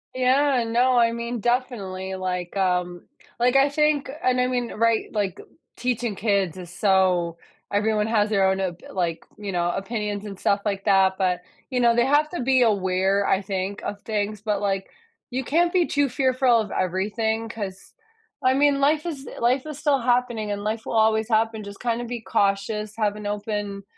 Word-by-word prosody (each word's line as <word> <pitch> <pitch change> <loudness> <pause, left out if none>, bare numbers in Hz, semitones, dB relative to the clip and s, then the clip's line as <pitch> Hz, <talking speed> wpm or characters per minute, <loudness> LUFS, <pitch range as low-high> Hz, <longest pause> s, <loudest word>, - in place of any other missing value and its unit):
Yeah, 255 0 +3
no, 245 +2 +3
I 230 -1 +4
mean, 235 +1 -4
definitely, 205 -6 -2
like, 180 -1 -4
um 180 -2 0 0.4
like, 245 +2 +3
I 275 +1 +5
think 300 -1 +1
and 255 0 +2
I 250 - +2
mean, 245 -2 -2
right, 230 0 +2
like, 200 -4 -2 0.4
teaching 240 -3 -1
kids 195 -4 0
is 180 -2 -8
so 185 -4 +2 0.3
everyone 210 +1 +1
has 215 -2 +2
their 195 -3 +3
own 190 0 0
op 180 -2 -3
like, 170 -3 -2
you 205 -1 -5
know, 175 -1 0
opinions 210 +1 -3
and 195 -2 -8
stuff 200 0 +1
like 195 -2 -2
that, 190 -1 +4
but 180 -2 0 0.3
you 255 - -1
know, 235 -1 +4
they 240 0 +3
have 295 +3 +3
to 350 - -3
be 260 0 +4
aware, 195 -2 +1
I 195 - +2
think, 195 +1 -3
of 205 0 -5
things, 210 -1 -2
but, 210 -2 -1
like, 195 -1 -2 0.4
you 260 +1 -2
can't 340 +7 +2
be 360 -2 +3
too 285 -2 +1
fearful 255 -1 +3
of 210 - -6
everything 215 +5 -1
'cause, 200 -4 -7 0.5
I 255 0 +4
mean, 285 0 +3
life 295 +3 +2
is 290 -5 -5
life 255 +3 +2
is 305 -2 -6
still 290 -2 +2
happening 240 -3 0
and 205 0 -3
life 220 +1 -3
will - - -3
always 220 0 +3
happen, 220 -1 +1
just 200 0 -10
kind 235 -1 -1
of 240 - -5
be 240 -1 -5
cautious, 205 +1 -1
have 210 -2 0
an 210 -1 -6
open, 205 -1 -3
215 Hz, 190 wpm, -24 LUFS, 195-245 Hz, 0.5 s, I